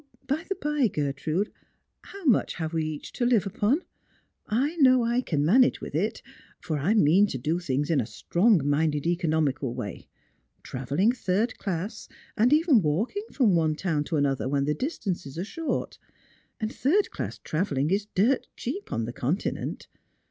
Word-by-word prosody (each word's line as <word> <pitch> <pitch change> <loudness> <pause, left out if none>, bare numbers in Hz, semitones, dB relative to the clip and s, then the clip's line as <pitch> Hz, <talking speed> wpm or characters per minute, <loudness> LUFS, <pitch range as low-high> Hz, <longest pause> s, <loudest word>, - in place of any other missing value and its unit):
0, 280 - -35 0.3
by - - -11
the 390 - 0
bye, 295 - +1
Grertrn 155 +6 -1
',d^ - - -29
iww 395 -2 -16
nrucli 250 -7 +3
have 160 -2 -4
wc 165 -1 0
each 155 -1 -5
to - - -2
live 240 -4 +3
upon? 210 - +1 0.6
I 270 +9 0
know 255 -4 +5
I 235 +2 +1
can 150 - 0
manage 245 +10 +4
•vAt\v 150 - -3
it, 215 +4 -2 0.4
for 155 -3 -3
I 185 +10 +2
mean 195 +1 +5
to 135 - -4
do 155 +7 -1
things 145 -2 -1
in 145 -5 +3
a 110 - -5
strong 175 - +2
minded 150 0 +1
economical 155 -7 0
way 100 -3 -6 0.3
— - - -44
travelling 140 - 0
third 225 -1 0
class, 195 +3 -4 0.3
and 235 +4 +3
even 300 - +5
walking 210 - -1
from 235 -8 +3
one 160 -2 +2
town 160 -3 -1
to 165 - -2
another 135 -2 0
when 140 0 +1
the 150 - +1
distances 180 - -4
are 175 - -2
short; 325 - -3 0.6
and 220 +1 -3
third 370 +10 +2
class - - -5
travelling 155 -3 -1
is 200 +1 0
dirt 235 +8 +2
cheap 310 +12 -5
on 115 - -1
the 120 - -6
Continent. 145 +12 -3
180 Hz, 175 wpm, -27 LUFS, 150-240 Hz, 0.6 s, know